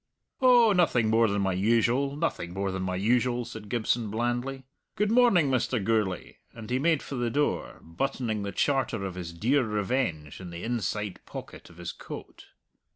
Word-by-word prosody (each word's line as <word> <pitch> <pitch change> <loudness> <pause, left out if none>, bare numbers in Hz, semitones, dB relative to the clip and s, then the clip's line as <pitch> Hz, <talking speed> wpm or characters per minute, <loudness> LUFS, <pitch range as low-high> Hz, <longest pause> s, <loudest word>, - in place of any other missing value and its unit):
"Oh, 240 -4 +6
nothing 125 - +3
more 115 +1 +4
than 100 -1 0
my 95 -1 +1
usual, 115 +8 +2
nothing 95 - -2
more 100 0 -1
than 95 0 -3
my 90 0 -2
usual," 120 +4 +1
said 110 -3 -9
Gibson 115 -1 0
blandly. 120 +4 -2 0.3
"Good 210 +1 +1
morning, 225 - +5
Mr. 130 0 +1
Gourlay," 105 -3 -1 0.2
and 115 0 -9
he 125 - +2
made 160 0 +2
for - - -8
the 120 -2 -1
door, 145 +5 -1
buttoning 110 +4 -2
the 100 0 -3
charter 125 -7 0
of 95 - -4
his 90 -2 -6
dear 125 +11 +2
revenge 105 - -2
in 90 - -7
the 85 0 -7
inside 105 -4 -2
pocket - - -9
of 85 - -17
his 85 -1 -5
coat. - - -10
115 Hz, 175 wpm, -28 LUFS, 100-135 Hz, 0.3 s, Oh